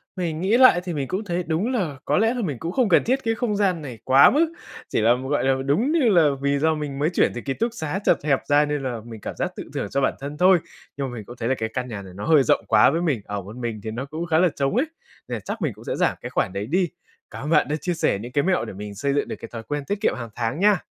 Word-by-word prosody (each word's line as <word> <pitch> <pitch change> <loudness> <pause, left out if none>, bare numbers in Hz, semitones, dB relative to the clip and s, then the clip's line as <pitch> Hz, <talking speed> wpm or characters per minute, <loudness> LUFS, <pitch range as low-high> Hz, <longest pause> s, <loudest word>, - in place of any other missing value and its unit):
mình 170 -4 -3
nghĩ 200 +6 +3
lại 255 -9 +7
thì 180 - -4
mình 140 -3 -2
cũng 190 +8 -2
thấy 180 -2 -2
đúng 180 +10 0
là 165 - -1
có - - +2
lẽ 225 +3 +3
là 245 - -3
mình 150 - -3
cũng 165 +2 -4
không 245 -1 +1
cần 175 - +5
thiết 265 +3 0
cái 225 0 0
không 230 -3 -1
gian 190 -5 +1
này 125 -7 -8
quá 135 +2 +7
mức, 320 +3 +2 0.4
chỉ - - 0
là, 115 +2 +5 0.2
gọi 145 - +1
là, 135 0 +3
đúng 205 - +2
như 300 -8 +3
là 170 -6 +5
vì 140 0 +1
do 160 +1 +2
mình 145 -2 -5
mới 155 +3 +2
chuyển 175 - +2
từ 120 - -4
ký 135 - -2
túc 230 - -2
xá 160 -1 -3
chật - - +3
hẹp 140 -3 +2
ra 145 +1 +4
nên 145 -2 -2
là 120 -3 -3
mình 115 -2 -9
cảm - - -6
giác - - -2
tự - - -6
thưởng - - -2
cho 140 - 0
bản - - +2
thân 145 +2 -6
thôi. 185 0 +5 0.4
Nhưng 140 - -2
mà - - -8
mình 110 -3 -7
cũng 120 - -10
thấy 115 +1 -3
là 135 - +2
cái 110 0 -2
căn 125 -1 -2
nhà 105 -4 -6
này 95 -2 -11
nó 100 - -6
hơi 155 -4 +5
rộng - - +2
quá 110 -1 +6
với 165 +5 0
mình, 145 -11 0
ở 100 0 -4
một 100 +4 -10
mình 120 -3 -4
thì 110 - -4
nó 120 +4 -4
cũng 155 +4 -5
khá 160 -1 +2
là 180 -1 +4
trống 140 +5 0
ấy, 260 +6 +3 0.4
nên 120 - -3
là - - -4
chắc 95 - -6
mình - - -1
cũng - - -15
sẽ - - -2
giảm - - +1
cái - - -6
khoản 90 - -1
đấy 100 +1 -3
đi. 175 - +1 0.4
Cảm - - -7
ơn 150 - -4
bạn 160 -2 +4
đã 150 - 0
chia 165 +4 -2
sẻ 130 -11 0
những 120 +4 -8
cái 145 +2 +1
mẹo 185 0 +1
để - - -7
mình 105 +1 -7
xây 140 +7 -1
dựng 145 - 0
được - - -4
cái 115 - -9
thói 115 -1 -7
quen 145 +2 -4
tiết 205 0 -3
kiệm - - +2
hằng 120 -2 -6
tháng 120 +6 -2
nha. 205 -3 +3
150 Hz, 320 wpm, -23 LUFS, 125-185 Hz, 0.4 s, lại